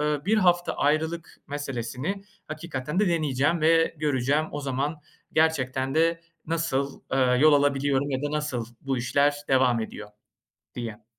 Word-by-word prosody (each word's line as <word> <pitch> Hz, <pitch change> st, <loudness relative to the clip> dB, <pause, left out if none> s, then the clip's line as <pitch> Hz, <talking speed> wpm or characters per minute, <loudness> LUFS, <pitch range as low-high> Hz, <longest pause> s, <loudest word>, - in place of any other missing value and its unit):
eee, 150 Hz, -1 st, 0 dB
1 220 Hz, +2 st, +3 dB
hafta 175 Hz, -3 st, +3 dB
ayrılık 160 Hz, +3 st, -1 dB
meselesini 140 Hz, -, -4 dB, 0.3 s
hakikaten 155 Hz, 0 st, -4 dB
de 210 Hz, -, +3 dB
deneyeceğim 155 Hz, -1 st, +1 dB
ve 165 Hz, +1 st, +3 dB
göreceğim. 145 Hz, 0 st, +1 dB
O 145 Hz, -, -4 dB
zaman 140 Hz, +3 st, -2 dB, 0.3 s
gerçekten 135 Hz, -4 st, +1 dB
de 165 Hz, +1 st, +2 dB, 0.3 s
nasıl, 150 Hz, -4 st, -1 dB
eee, 125 Hz, -1 st, +3 dB
yol 155 Hz, +1 st, +7 dB
alabiliyorum 140 Hz, -1 st, +2 dB
ya 130 Hz, +1 st, -2 dB
da 145 Hz, -, -1 dB
nasıl 150 Hz, -6 st, -2 dB, 0.2 s
bu 135 Hz, -2 st, -2 dB
işler 140 Hz, +4 st, +2 dB
devam 130 Hz, -3 st, +3 dB
ediyor 105 Hz, -1 st, -7 dB, 0.7 s
diye. 115 Hz, -2 st, -6 dB
145 Hz, 140 wpm, -26 LUFS, 130-160 Hz, 0.7 s, yol